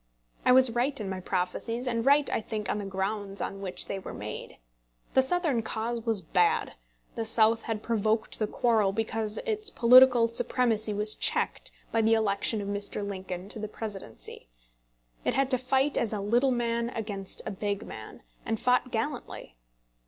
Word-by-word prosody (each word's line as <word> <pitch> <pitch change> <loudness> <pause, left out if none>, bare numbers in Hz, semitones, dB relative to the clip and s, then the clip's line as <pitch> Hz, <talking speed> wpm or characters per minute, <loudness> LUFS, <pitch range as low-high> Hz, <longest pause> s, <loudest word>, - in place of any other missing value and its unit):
I - - +5
was 255 -1 +7
right 250 +4 0
in 205 -3 -4
my 190 - -4
prophecies, 200 +7 -2
and 230 -2 -1
right, 285 +2 +4
I - - 0
think, 215 -2 -4
on 210 - -2
the 205 - -5
grounds 195 +1 -3
on 195 - -4
which 185 -2 -2
they 195 - -4
were - - -8
made. 105 +1 -7 0.6
The 265 - +6
Southern 300 -4 0
cause 225 +2 -3
was 220 -4 +1
bad. 435 - +1 0.4
The 230 - -3
South 225 0 +3
had 220 -2 -4
provoked 220 -1 0
the 215 - 0
quarrel 215 -4 +1
because 220 0 -2
its 430 -2 0
political 250 - +6
supremacy 230 -2 +1
was 210 +1 +3
checked - - +1 0.2
by 225 - +2
the 225 +1 +4
election 210 0 +1
of 200 - -5
Mr. 205 0 -3
Lincoln 185 -2 -6
to 220 - -4
the 215 - -4
Presidency. 205 - -5 0.8
It - - 0
had 270 0 +1
to 255 - +3
fight 265 +3 +1
as 225 -2 -1
a 210 - -2
little 235 +7 +2
man 235 -1 -1
against 205 -5 -5
a - - -3
big 200 0 -3
man, - - -10 0.2
and 225 -1 -2
fought 250 0 +2
gallantly. 235 - -4
225 Hz, 175 wpm, -28 LUFS, 205-245 Hz, 0.8 s, was